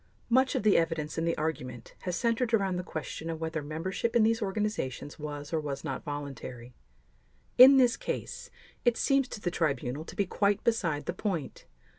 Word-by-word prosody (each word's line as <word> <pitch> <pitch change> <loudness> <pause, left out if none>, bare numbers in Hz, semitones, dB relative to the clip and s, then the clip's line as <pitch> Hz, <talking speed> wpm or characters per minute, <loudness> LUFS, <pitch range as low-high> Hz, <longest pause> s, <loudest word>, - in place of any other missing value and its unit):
Much 260 +2 +4
of - - 0
the 210 -2 +5
evidence 160 -2 -1
and 165 - 0
the 165 - 0
argument 130 -7 -4
has 180 -2 -3
centered 230 +3 +1
around 195 -3 0
the 180 - -1
question 160 -1 -5
of 165 -1 -4
whether 160 -1 -2
membership 170 +10 -3
in 235 - +6
these 225 +1 +2
organizations 195 - -3
was 145 0 -6
or 160 - +2
was 140 -2 -4
not 135 -2 -4
voluntary; 135 -4 -6 0.9
in 265 +2 +11
this 250 -3 +4
case, - - -5 0.3
it 240 -2 +3
seems 275 -2 +2
to 230 - -7
the 175 -4 -2
Tribunal 140 -4 -1
to - - -10
be 200 - +1
quite 200 +2 +1
beside 170 -11 0
the - - -2
point. 185 -5 -4
165 Hz, 185 wpm, -29 LUFS, 150-215 Hz, 0.9 s, in